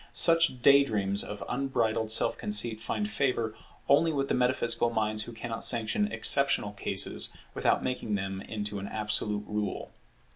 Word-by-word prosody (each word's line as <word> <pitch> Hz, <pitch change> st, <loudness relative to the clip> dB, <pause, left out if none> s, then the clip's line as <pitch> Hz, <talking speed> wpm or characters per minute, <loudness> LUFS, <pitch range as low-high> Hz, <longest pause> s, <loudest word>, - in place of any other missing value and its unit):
Such 165 Hz, -7 st, +5 dB
day 140 Hz, 0 st, +6 dB
dreams 100 Hz, -5 st, -1 dB
of 105 Hz, 0 st, -7 dB
unbridled 120 Hz, -4 st, -1 dB
self 110 Hz, -, +2 dB
conceit 120 Hz, -, -3 dB
find 210 Hz, -, -3 dB
favour 125 Hz, -, -2 dB, 0.3 s
only 160 Hz, +4 st, +3 dB
with 140 Hz, -2 st, -2 dB
the -, -, +1 dB
metaphysical 120 Hz, -2 st, +1 dB
minds 110 Hz, -2 st, -2 dB
who -, -, -9 dB
cannot 115 Hz, 0 st, -5 dB
sanction 120 Hz, -, 0 dB
exceptional 140 Hz, -7 st, +4 dB
cases 100 Hz, -, -1 dB, 0.2 s
without -, -, 0 dB
making 125 Hz, -4 st, -3 dB
them 95 Hz, -1 st, -4 dB
into 105 Hz, -1 st, -5 dB
an 100 Hz, -, -6 dB
absolute 105 Hz, -1 st, -2 dB
rule. 105 Hz, -2 st, -4 dB
115 Hz, 150 wpm, -28 LUFS, 105-135 Hz, 0.3 s, day